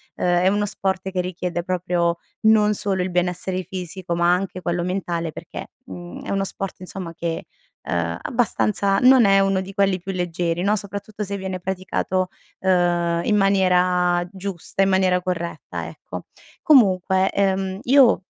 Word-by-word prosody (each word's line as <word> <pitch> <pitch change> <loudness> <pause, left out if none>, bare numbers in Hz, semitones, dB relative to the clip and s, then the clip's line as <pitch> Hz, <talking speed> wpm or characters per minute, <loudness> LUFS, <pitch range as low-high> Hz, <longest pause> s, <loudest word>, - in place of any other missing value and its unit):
ehm, 175 0 +1
è - - +4
uno 205 +1 +2
sport 190 -1 -2
che 185 - -2
richiede 180 -1 -3
proprio 175 -2 0 0.2
non 215 -1 +4
solo 195 -2 -1
il 185 - -1
benessere 180 +1 -1
fisico, 180 -1 -5
ma 170 +1 +3
anche 185 0 -2
quello 175 0 -1
mentale, 175 -3 -2
perché, - - -8
mhmm, 90 -2 -9
è - - -7
uno 195 0 0
sport 195 -1 -6
insomma 185 -2 -7
che, 165 0 -4 0.4
ehm, 85 0 -1
abbastanza 210 -4 +1
non 255 -3 +6
è 195 0 +5
uno 195 -1 +2
di 190 +1 -6
quelli 195 -2 +2
più 195 +2 -5
leggeri, 175 -1 -1
no, 205 +3 +2
soprattutto 205 +1 -6
se 200 +1 -4
viene 190 -1 -4
praticato, 185 0 -2 0.3
ehm, 175 -2 +2
in 210 - +2
maniera 180 -3 +3
giusta 195 0 -3
in 195 - +2
maniera 185 -1 +3
corretta, 175 -2 -4
ecco. - - -9 0.4
Comunque, 190 - +4
ehm, 190 -1 0
io 260 -5 +5
185 Hz, 155 wpm, -22 LUFS, 175-195 Hz, 0.4 s, non